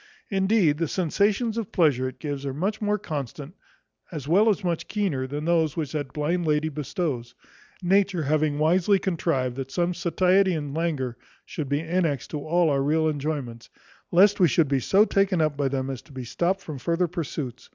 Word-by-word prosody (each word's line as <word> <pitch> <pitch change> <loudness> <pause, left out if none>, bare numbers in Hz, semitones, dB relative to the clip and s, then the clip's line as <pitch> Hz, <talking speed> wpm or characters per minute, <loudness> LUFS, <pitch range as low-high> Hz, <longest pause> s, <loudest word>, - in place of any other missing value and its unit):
Indeed, 190 -6 +2
the 165 - 0
sensations 205 - 0
of 220 - -5
pleasure 140 -7 +2
it - - -14
gives 145 -3 -5
are 135 -1 -4
much 195 +9 -2
more 210 0 +1
constant 145 - -6 0.6
as 150 -5 -6
well 200 +8 +4
as 210 -1 0
much 170 -2 -2
keener, 175 -12 -1
than 145 +3 -4
those 165 -3 +1
which 150 -4 -2
that 145 -4 -4
blind 160 +4 -1
lady 150 +1 +1
bestows; 145 - -4 0.5
nature 190 -2 +2
having 150 0 +1
wisely 175 +6 +3
contrived, 150 -9 -1
that 135 -1 -4
some 175 +4 0
satiety 185 +2 +2
and 145 -3 -4
languor 145 -7 -2 0.3
should 150 -5 -5
be 145 +1 0
annexed 165 -7 -1
to 150 - -3
all 165 +2 +2
our 140 -1 +1
real 155 +3 +2
enjoyments, 140 -6 -3 0.4
lest 200 +4 +5
we 180 - +6
should 165 -2 +2
be 135 -1 +1
so 195 - +4
taken 195 -4 +1
up 155 -2 +1
by 140 -1 0
them, 135 0 -2
as 130 - -6
to 160 - -20
be 130 -2 -6
stopt 175 +10 -1
from 155 -7 -7
further 170 +6 0
pursuits. 150 -6 -5
155 Hz, 190 wpm, -25 LUFS, 140-180 Hz, 0.6 s, we